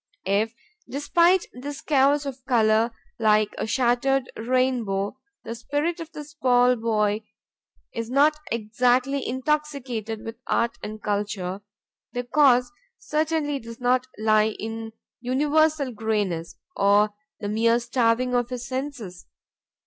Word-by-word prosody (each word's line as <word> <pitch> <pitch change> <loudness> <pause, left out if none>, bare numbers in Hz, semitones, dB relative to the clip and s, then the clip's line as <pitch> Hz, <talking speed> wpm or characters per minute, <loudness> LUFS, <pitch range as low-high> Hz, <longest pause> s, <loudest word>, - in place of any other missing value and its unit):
If, 210 +4 +1 0.3
despite 340 +6 +3
this 280 +3 -7
chaos 285 0 +3
of 265 -2 -6
color, 225 -2 +3 0.3
like 215 -1 +3
a - - -2
shattered 255 +1 +1
rainbow, 240 -3 0 0.2
the - - -5
spirit 290 +9 -2
of 325 -1 -7
the 300 - -7
small 250 -4 +3
boy 215 -2 0 0.7
is 230 0 -4
not 285 +4 +4 0.2
exactly 245 +5 +1
intoxicated 260 -5 -2
with 225 0 -6
art 235 0 0
and 215 0 -7
culture, 200 -2 -2 0.5
the 245 - -2
cause 250 -1 +4 0.3
certainly 305 -2 -1
does 230 -1 -10
not 250 +1 +2
lie 215 0 +3
in 225 0 -6 0.3
universal 290 +3 +2
grayness 205 -7 -2 0.2
or 205 +1 +4 0.3
the 205 - -4
mere 230 +3 +3
starving 240 +1 +1
of 245 -1 +1
his 250 0 -5
senses. 255 -9 -5
245 Hz, 120 wpm, -25 LUFS, 220-275 Hz, 0.7 s, not